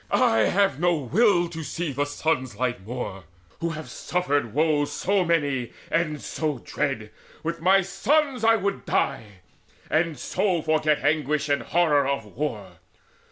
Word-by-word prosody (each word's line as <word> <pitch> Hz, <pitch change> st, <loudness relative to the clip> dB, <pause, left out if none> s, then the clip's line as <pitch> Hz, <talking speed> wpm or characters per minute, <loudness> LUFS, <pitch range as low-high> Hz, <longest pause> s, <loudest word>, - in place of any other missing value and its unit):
I 110 Hz, -, +3 dB
have 195 Hz, -8 st, +2 dB
no 175 Hz, 0 st, +3 dB
will 175 Hz, -, +3 dB
to 165 Hz, -1 st, -6 dB
see 165 Hz, 0 st, -3 dB
the 145 Hz, +2 st, -1 dB
sun's 145 Hz, -5 st, -1 dB
light 125 Hz, -4 st, -2 dB
more, 100 Hz, -5 st, -6 dB, 0.3 s
Who 170 Hz, -, -1 dB
have 155 Hz, -1 st, -6 dB
suffered 145 Hz, -9 st, -1 dB
woes 150 Hz, +1 st, +1 dB
so 195 Hz, +5 st, +1 dB
many 145 Hz, -8 st, 0 dB, 0.2 s
and 155 Hz, -3 st, 0 dB
so 150 Hz, -1 st, -3 dB
dread. -, -, -3 dB, 0.3 s
With 165 Hz, +1 st, -3 dB
my 190 Hz, +3 st, +5 dB
sons 255 Hz, +8 st, +1 dB
would 220 Hz, -3 st, +3 dB, 0.2 s
I -, -, -6 dB
die, -, -, +1 dB, 0.7 s
and 160 Hz, -1 st, +1 dB
so 180 Hz, +5 st, 0 dB
forget 155 Hz, -1 st, +1 dB
Anguish 150 Hz, 0 st, +1 dB
and 140 Hz, -, +2 dB
horror 150 Hz, -5 st, +2 dB
of 140 Hz, -5 st, -1 dB
war. 105 Hz, -, -5 dB
155 Hz, 150 wpm, -25 LUFS, 140-175 Hz, 0.7 s, my